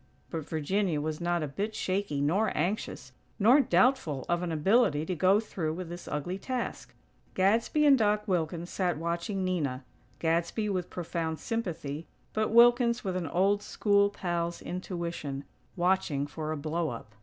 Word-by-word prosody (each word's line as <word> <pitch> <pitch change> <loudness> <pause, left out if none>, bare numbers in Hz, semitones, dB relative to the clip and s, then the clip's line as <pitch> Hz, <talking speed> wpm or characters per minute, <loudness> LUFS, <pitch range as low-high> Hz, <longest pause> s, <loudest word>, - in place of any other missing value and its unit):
But 160 -3 -5
Virginia 165 +2 0
was 155 +1 -3
not 175 -1 0
a - - -2
bit 205 +10 -3
shaky 185 -7 -1
nor 190 +10 +2
anxious, 185 +7 -2 0.3
nor 235 +7 +6
doubtful 245 - +2
of 175 0 +1
an 175 -2 -2
ability 160 -1 +3
to 185 - -2
go 185 +4 +4
through 170 -8 -3
with 180 -1 -6
this 175 0 -8
ugly 175 +6 -3
task. 255 +2 -4 0.4
Gadsby 225 +10 +3
and 275 -3 +6
Doc 210 0 +2
Wilkins 170 -2 -1
sat 180 -5 0
watching 170 +4 -2
Nina; 145 -8 -1 0.3
Gadsby 170 +7 0
with 185 -3 -2
profound 165 -2 -3
sympathy, 165 -9 -4 0.3
but 215 0 0
Wilkins 240 +1 +5
with 190 -3 -2
an 180 -3 -2
old 195 +6 +2
school 200 -1 +2
pal's 170 -3 -2
intuition, 170 -6 -4 0.3
watching 175 -6 +1
for 155 +2 -5
a 155 - -2
blow 160 +2 -1
up. 115 -2 -8
175 Hz, 155 wpm, -29 LUFS, 160-205 Hz, 0.4 s, nor